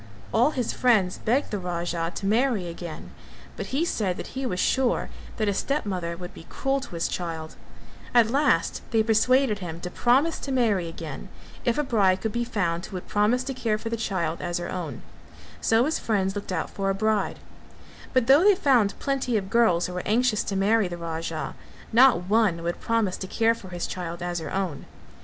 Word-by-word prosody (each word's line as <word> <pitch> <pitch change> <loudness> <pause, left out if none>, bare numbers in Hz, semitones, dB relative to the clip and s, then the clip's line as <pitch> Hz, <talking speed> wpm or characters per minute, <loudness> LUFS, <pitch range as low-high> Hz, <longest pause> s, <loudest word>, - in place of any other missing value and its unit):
All 240 +6 +4
his 255 -6 -2
friends 210 -8 +2
begged 250 +6 0
the 205 - -1
Raja 170 -1 -2
to 195 - -4
marry 220 -2 +2
again, 170 -1 -7 0.4
but - - -5
he 290 +6 0
said 195 - -1
that - - -7
he 265 0 -2
was 180 -5 -2
sure 260 +3 +1 0.3
that 215 - 0
a 200 - +2
stepmother 190 - -2
would 180 0 -8
be 165 - -12
cruel 270 +1 0
to 260 -10 -8
his 165 - 0
child; 165 -3 -5 0.6
at 235 -2 +4
last 280 0 +2
they 225 -2 +3
persuaded 225 +1 +3
him 170 -3 -6
to 180 - -5
promise 270 - +2
to 275 - -5
marry 220 -9 +2
again, 165 0 -7 0.4
if 240 - +2
a 295 - +2
bride 200 -8 +3
could 220 - -1
be 240 +2 -1
found 175 -8 -1
who - - -9
would 180 - -6
promise 215 +5 +2
to 270 +1 -4
care 230 -4 0
for 225 +1 -5
the 230 - -1
child 175 -7 -2
as 175 0 -2
her 175 0 -4
own, 175 -5 -5 0.6
so 225 +2 +3
his 315 +2 0
friends 195 -3 0
looked 200 -1 -5
out 165 -4 -2
for 195 -1 -2
a 195 - +1
bride; 215 -1 0 0.7
but 255 -2 +3
though 275 +7 +6
they 410 0 +6
found 255 - +3
plenty 270 -4 0
of 195 -1 -4
girls 220 -8 +4
who 180 - -5
were 180 - -4
anxious 225 0 +2
to 195 - -3
marry 205 +2 +3
the 175 -1 -6
Raja, 165 -1 -4 0.4
not 240 -6 +6
one 195 -4 +2
would 170 +1 -3
promise 225 -5 0
to 190 - -6
care 225 +3 +2
for 195 -5 -11
his 175 -1 -4
child 175 -1 -5
as 175 -1 -2
her 160 -2 -6
own. 185 -7 -3
205 Hz, 205 wpm, -26 LUFS, 175-240 Hz, 0.7 s, though